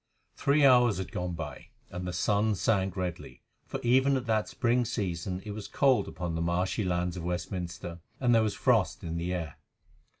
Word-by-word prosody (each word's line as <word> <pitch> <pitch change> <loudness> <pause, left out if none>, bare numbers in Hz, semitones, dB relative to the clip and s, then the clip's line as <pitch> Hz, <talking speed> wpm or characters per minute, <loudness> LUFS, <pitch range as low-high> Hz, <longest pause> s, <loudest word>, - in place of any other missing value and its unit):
Three 145 +1 +3
hours 125 -5 +6
had 95 - -5
gone 90 0 -3
by, 75 -6 -7 0.2
and 90 0 -5
the - - -2
sun 105 +4 +1
sank 95 0 +1
redly, 90 -2 -5 0.2
for - - -4
even 130 +3 +4
at 130 - -4
that 110 -2 +1
spring 125 -1 +1
season 95 -4 -3
it 105 - -5
was 105 0 -6
cold 135 -3 +3
upon 85 -2 -4
the 80 - -2
marshy 90 +5 0
lands 90 -1 -1
of 85 - -5
Westminster, 90 0 -4 0.2
and 125 -2 +3
there 115 - +5
was 105 -2 0
frost 110 -10 +2
in 85 -1 -3
the 85 +2 -2
air. 85 -5 -4
95 Hz, 190 wpm, -29 LUFS, 85-115 Hz, 0.2 s, hours